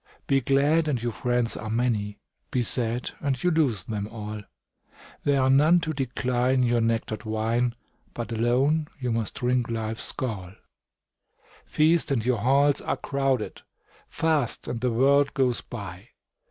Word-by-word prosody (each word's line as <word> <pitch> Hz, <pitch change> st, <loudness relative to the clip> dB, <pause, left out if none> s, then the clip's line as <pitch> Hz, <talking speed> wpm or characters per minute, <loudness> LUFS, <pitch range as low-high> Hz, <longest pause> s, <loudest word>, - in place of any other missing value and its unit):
Be 135 Hz, 0 st, +2 dB
glad, 145 Hz, +5 st, +2 dB
and 140 Hz, -5 st, 0 dB
your 120 Hz, +1 st, -2 dB
friends 120 Hz, 0 st, 0 dB
are 110 Hz, -, -6 dB
many; 110 Hz, -3 st, -1 dB, 0.3 s
Be 125 Hz, -4 st, 0 dB
sad, 120 Hz, 0 st, -1 dB
and 140 Hz, -2 st, -1 dB
you 180 Hz, -, +3 dB
lose 130 Hz, -, +1 dB
them 105 Hz, -2 st, -3 dB
all; 105 Hz, -1 st, -6 dB, 0.8 s
There 140 Hz, -1 st, +3 dB
are 130 Hz, 0 st, +3 dB
none 155 Hz, +6 st, +5 dB
to 160 Hz, -1 st, -2 dB
decline 130 Hz, -1 st, 0 dB
your 120 Hz, -1 st, +2 dB
nectar'd 115 Hz, -1 st, -1 dB
wine, 115 Hz, +2 st, 0 dB, 0.4 s
But 120 Hz, 0 st, -5 dB
alone 130 Hz, +7 st, +2 dB
you 125 Hz, -2 st, -2 dB
must 115 Hz, -2 st, -2 dB
drink 125 Hz, -1 st, 0 dB
life's 110 Hz, -1 st, -3 dB
gall. 100 Hz, -8 st, -4 dB, 1.1 s
Feast, 160 Hz, +2 st, +2 dB
and 120 Hz, -5 st, 0 dB
your 125 Hz, -3 st, +1 dB
halls 140 Hz, +4 st, +3 dB
are -, -, -2 dB
crowded; 135 Hz, -4 st, -1 dB, 0.5 s
Fast, 155 Hz, -6 st, 0 dB
and 115 Hz, -, -4 dB
the 125 Hz, -, +1 dB
world 140 Hz, +4 st, +3 dB
goes 130 Hz, -3 st, +1 dB
by. 100 Hz, -3 st, -8 dB
125 Hz, 150 wpm, -26 LUFS, 115-140 Hz, 1.1 s, none